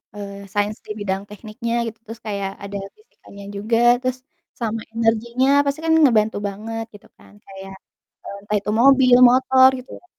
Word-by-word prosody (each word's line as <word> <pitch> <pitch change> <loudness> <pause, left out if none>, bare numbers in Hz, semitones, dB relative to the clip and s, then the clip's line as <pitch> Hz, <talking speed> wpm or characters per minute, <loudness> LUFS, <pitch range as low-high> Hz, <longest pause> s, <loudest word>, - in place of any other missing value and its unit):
eee, 200 -1 -8 0.2
sains 205 +1 -1
di - - -8
bidang 195 -1 -2
tekniknya 220 +3 -6
gitu, 225 - -8
terus 225 0 -10
kayak 200 -2 -3
ada 200 0 -7 0.2
fisikanya 200 - -16
juga 215 +3 -1 0.2
terus 255 0 -2 0.4
sama 225 -1 -3
energinya 230 +3 0 0.2
pasti 280 +2 -2
kan 320 - +2
ngebantu 220 -5 +3
banget 225 +3 -6
gitu 205 - -16
kan - - -20
kayak, 195 0 -11 0.5
eee, - - -8
entah 210 +1 -3
itu 210 +1 -4
mobil, 260 -2 +6
motor 260 +1 +5
gitu 255 - -14
ya. - - -27
220 Hz, 165 wpm, -21 LUFS, 205-250 Hz, 0.5 s, mobil